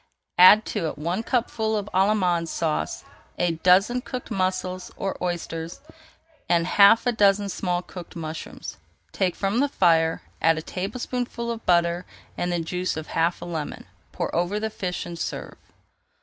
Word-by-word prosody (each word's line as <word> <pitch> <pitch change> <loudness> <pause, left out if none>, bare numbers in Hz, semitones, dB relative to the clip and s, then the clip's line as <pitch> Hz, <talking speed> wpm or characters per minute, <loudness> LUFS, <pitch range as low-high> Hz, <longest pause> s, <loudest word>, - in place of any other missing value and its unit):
Add 205 +4 +9
to 190 -7 -1
it 150 - -5
one 170 +7 -2
cupful 225 -2 0
of 205 -1 -3
Allemande 185 -4 +2
Sauce, 160 -1 -2 0.3
a 175 -1 +1
dozen 185 +9 +3
cooked 250 -2 -7
mussels 185 -2 -2
or 195 -1 -2
oysters, 170 -1 -4 0.7
and 170 -1 +3
half 200 +5 +6
a 245 - +3
dozen 205 -2 +3
small 180 -1 -2
cooked 180 -2 -10
mushrooms. 160 -1 -7 0.3
Take 185 -3 0
from 200 +4 0
the 285 +1 +2
fire, 165 - +2 0.2
add 165 0 +4
a 155 - -4
tablespoonful 235 +5 -3
of 230 -1 -7
butter 170 0 +2 0.3
and 175 - -2
the 175 - 0
juice 180 +1 -2
of 160 - -6
half 165 +1 0
a - - -6
lemon. 160 -4 -5 0.3
Pour - - -3
over 175 +5 0
the 220 0 -3
fish 180 -3 -4
and 170 -1 -7
serve. - - -5
180 Hz, 160 wpm, -25 LUFS, 170-210 Hz, 0.7 s, Add